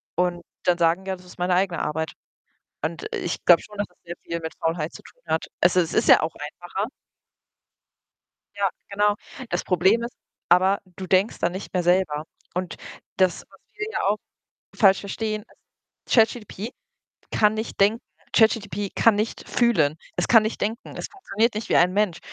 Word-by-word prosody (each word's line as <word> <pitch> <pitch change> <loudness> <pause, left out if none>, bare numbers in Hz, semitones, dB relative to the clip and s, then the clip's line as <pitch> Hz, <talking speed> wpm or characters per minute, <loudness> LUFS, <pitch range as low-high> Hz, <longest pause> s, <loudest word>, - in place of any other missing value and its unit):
und 175 -1 0 0.2
dann 175 -1 +3
sagen: 170 +3 +2
„Ja, 190 0 -2
das 180 0 -17
ist 180 - -15
meine 180 0 +2
eigene 185 -2 +1
Arbeit.“ 160 0 -2 0.7
Und 160 0 -3
ich 175 - -3
glaube 175 -2 +7
schon, 210 - -13
dass 205 - 0
das 180 - -31
sehr 175 0 -6
viel 170 0 -4
mit 160 0 -6
Faulheit 165 -1 -1
zu - - -11
tun - - -19
hat. 160 0 0 0.2
Es 175 +1 +4
i - - +7
es 165 -3 -2
ist - - +2
ja - - +8
auch 155 +1 -2
einfacher. 175 +7 -5 1.7
Ja, 200 -2 +1 0.2
genau. 205 +1 +2 0.4
Das - - -1
Problem 190 +6 +3
ist 235 - -5 0.3
aber, 185 +3 +5 0.2
du 190 - -6
denkst 190 +4 +2
dann 170 +1 0
nicht 190 - -7
mehr 180 - +2
selber. 175 -4 +2 0.3
Und 180 -1 -3 0.4
das 185 -3 +2
was 195 - -20 0.2
wir 425 0 -3
ja - - -1
auch 205 - +3 0.6
falsch 195 -3 +5
verstehen, 215 +1 -3 0.6
ist - - -3
ChatGPT 225 -2 +1 0.6
kann 210 -1 +4
nicht 220 +1 -5
denken, 215 +4 +4 0.3
ChatGPT 205 -3 +2
kann 230 -2 +5
nicht 215 +2 -3
fühlen. 160 -12 +3 0.2
Es 180 - +1
kann 225 -3 +7
nicht 220 - -3
denken. 225 +4 -3
Es - - -4
funktioniert 230 - 0
nicht 215 0 -4
wie - - +3
ein 180 +1 +4
Mensch, 200 -4 +1
190 Hz, 185 wpm, -24 LUFS, 175-210 Hz, 1.7 s, ja